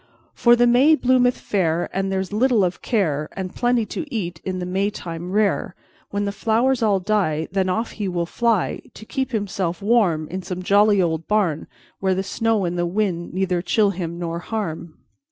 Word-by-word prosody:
For 240 Hz, 0 st, +5 dB
the 240 Hz, 0 st, +4 dB
May 255 Hz, +6 st, +5 dB
bloometh 250 Hz, -2 st, +3 dB
fair, 175 Hz, -4 st, 0 dB
And 195 Hz, +1 st, -1 dB
there's 190 Hz, 0 st, -2 dB
little 235 Hz, -1 st, +3 dB
of 180 Hz, 0 st, -2 dB
care, 155 Hz, -, 0 dB
And 185 Hz, -1 st, -5 dB
plenty 240 Hz, -2 st, +1 dB
to 300 Hz, +6 st, -6 dB
eat 175 Hz, -7 st, -4 dB
in 185 Hz, -1 st, -3 dB
the 180 Hz, -, -3 dB
Maytime 180 Hz, -2 st, -3 dB
rare. 200 Hz, -3 st, +1 dB, 0.3 s
When 205 Hz, 0 st, -2 dB
the 200 Hz, -, -1 dB
flowers 230 Hz, +5 st, +1 dB
all 205 Hz, -3 st, +3 dB
die, 180 Hz, -6 st, 0 dB
Then 190 Hz, -1 st, 0 dB
off 225 Hz, +5 st, -1 dB
he 205 Hz, -3 st, -4 dB
will 175 Hz, -2 st, -1 dB
fly, 230 Hz, +1 st, 0 dB
To 220 Hz, -, -11 dB
keep 265 Hz, +3 st, -2 dB
himself 195 Hz, -5 st, -2 dB
warm 195 Hz, -8 st, +2 dB
In 185 Hz, +2 st, -4 dB
some 180 Hz, 0 st, -5 dB
jolly 205 Hz, 0 st, +4 dB
old 165 Hz, -1 st, -2 dB
barn 195 Hz, -8 st, 0 dB, 0.3 s
Where 190 Hz, -1 st, +1 dB
the 190 Hz, -, -1 dB
snow 225 Hz, 0 st, 0 dB
and 175 Hz, 0 st, -2 dB
the 175 Hz, -, +1 dB
wind 175 Hz, -3 st, -2 dB
neither 185 Hz, -2 st, 0 dB
chill 205 Hz, +3 st, +2 dB
him 170 Hz, -3 st, -5 dB
nor 170 Hz, -1 st, -3 dB
harm. 170 Hz, -5 st, -5 dB
195 Hz, 190 wpm, -22 LUFS, 175-220 Hz, 0.3 s, For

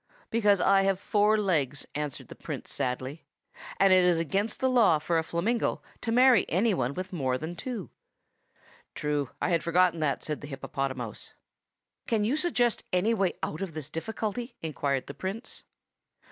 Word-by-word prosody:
"Because 210 Hz, -3 st, +4 dB
I 195 Hz, 0 st, +5 dB
have 195 Hz, -1 st, +1 dB
four 210 Hz, +1 st, +3 dB
legs," 150 Hz, -9 st, 0 dB
answered 150 Hz, -2 st, -4 dB
the -, -, -7 dB
Prince -, -, -7 dB
sadly; 130 Hz, +5 st, -3 dB, 0.6 s
"and 195 Hz, -1 st, +6 dB
it 185 Hz, -1 st, +6 dB
is 180 Hz, -2 st, +4 dB
against 195 Hz, +7 st, -1 dB
the 260 Hz, -, +2 dB
law 235 Hz, -10 st, +5 dB
for 165 Hz, +2 st, 0 dB
a -, -, -1 dB
flamingo 205 Hz, +9 st, -1 dB, 0.2 s
to 230 Hz, -, -2 dB
marry 250 Hz, +1 st, +6 dB
any 205 Hz, +6 st, +2 dB
one 130 Hz, -4 st, -1 dB
with 185 Hz, +1 st, -5 dB
more 130 Hz, -6 st, 0 dB
than 160 Hz, +5 st, -5 dB
two." 230 Hz, -3 st, -5 dB, 1.0 s
"True. 145 Hz, -3 st, -1 dB
I -, -, 0 dB
had 165 Hz, -2 st, +2 dB
forgotten 170 Hz, 0 st, +3 dB
that," 150 Hz, -3 st, 0 dB
said 150 Hz, -1 st, -4 dB
the 145 Hz, -, -7 dB
hippopotamouse. 135 Hz, -4 st, -4 dB, 0.7 s
"Can 220 Hz, -3 st, +1 dB
you 235 Hz, +7 st, +1 dB
suggest 275 Hz, -8 st, +1 dB
any 185 Hz, +6 st, +2 dB
way 195 Hz, -4 st, +1 dB
out 155 Hz, -, -3 dB
of 190 Hz, -4 st, -4 dB
the 155 Hz, -, -3 dB
difficulty?" 220 Hz, -, -4 dB
inquired 140 Hz, -3 st, -1 dB
the 140 Hz, -, -7 dB
Prince. 195 Hz, -, -5 dB
180 Hz, 170 wpm, -28 LUFS, 150-215 Hz, 1.0 s, and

